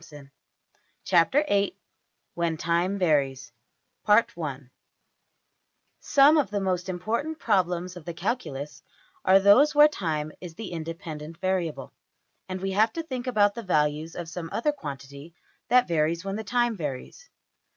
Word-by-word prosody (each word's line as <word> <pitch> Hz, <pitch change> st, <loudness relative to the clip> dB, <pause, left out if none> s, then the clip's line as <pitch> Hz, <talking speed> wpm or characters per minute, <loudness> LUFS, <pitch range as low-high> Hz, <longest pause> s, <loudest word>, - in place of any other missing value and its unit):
png}% 145 Hz, -4 st, -14 dB, 0.7 s
\Chapter{VIII}{When 180 Hz, -, 0 dB
Time 170 Hz, +5 st, 0 dB
Varies} 140 Hz, -8 st, 0 dB, 0.6 s
\First{Some} 155 Hz, -, +1 dB, 1.7 s
of 265 Hz, -, -7 dB
the 205 Hz, 0 st, -2 dB
most 185 Hz, -1 st, -2 dB
important 230 Hz, -, -2 dB
problems 180 Hz, -, 0 dB
of 175 Hz, -4 st, -11 dB
the 170 Hz, -, -5 dB
calculus 170 Hz, -, -4 dB, 0.4 s
are 190 Hz, +1 st, +6 dB
those 250 Hz, +10 st, +5 dB
where 295 Hz, +1 st, +8 dB
time 155 Hz, -, -3 dB
is 175 Hz, -3 st, -9 dB
the 215 Hz, -1 st, -7 dB
independent 165 Hz, -1 st, -7 dB
variable, 185 Hz, -4 st, -2 dB, 0.6 s
and 185 Hz, 0 st, -4 dB
we 195 Hz, 0 st, -2 dB
have 215 Hz, +4 st, +3 dB
to 330 Hz, -1 st, -4 dB
think 260 Hz, -5 st, -5 dB
about 205 Hz, -4 st, +3 dB
the 235 Hz, -, -6 dB
values 155 Hz, -4 st, 0 dB
of 175 Hz, -2 st, -6 dB
some 170 Hz, -1 st, -6 dB
other 295 Hz, +6 st, 0 dB
quantity 140 Hz, -, -9 dB, 0.3 s
that 250 Hz, 0 st, +4 dB
varies 165 Hz, +1 st, 0 dB
when 195 Hz, 0 st, -3 dB
the 220 Hz, -, -4 dB
time 240 Hz, +1 st, 0 dB
varies. 150 Hz, -, -7 dB
180 Hz, 130 wpm, -26 LUFS, 160-210 Hz, 1.7 s, where